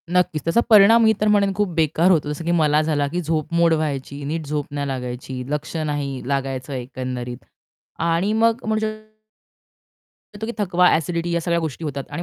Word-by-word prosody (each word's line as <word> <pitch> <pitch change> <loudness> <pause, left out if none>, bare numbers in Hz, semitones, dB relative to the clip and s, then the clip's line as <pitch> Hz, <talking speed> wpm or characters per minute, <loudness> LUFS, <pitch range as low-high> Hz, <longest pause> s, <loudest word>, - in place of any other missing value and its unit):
नक्कीच. 175 -4 +1
त्याचा 165 +8 +2
परिणाम 220 +2 +7
मी 220 0 +5
तर 215 - +2
म्हणेन 200 -2 +3
खूप 205 -1 0
बेकार 165 +2 +3
होतो. 155 -4 +2
जसं 150 +2 -6
की 170 - +1
मला 155 -3 +3
झाला 150 -2 0
की 175 +5 -3
झोप 160 -1 -2
मोड 170 -1 +4
व्हायची, 145 -2 -3
नीट 155 +2 -3
झोप 145 0 -2
नाही 145 -1 -2
लागायची, 125 0 -5
लक्ष 150 +2 -3
नाही 140 -3 -3
लागायचं 135 -1 -2
एकंदरीत 125 -1 -5 0.6
आणि 170 +4 +1
मग 230 +2 +2
म्हणू 220 0 0
शकतो 215 0 -7 1.1
की 235 - -3
थकवा, 180 -3 +3
एसिडिटी 170 +1 -2
या 170 - +1
सगळ्या 170 +1 0
गोष्टी 160 0 -5
होतात 140 -3 -4
आणि 155 +4 -4
160 Hz, 180 wpm, -21 LUFS, 140-180 Hz, 1.1 s, परिणाम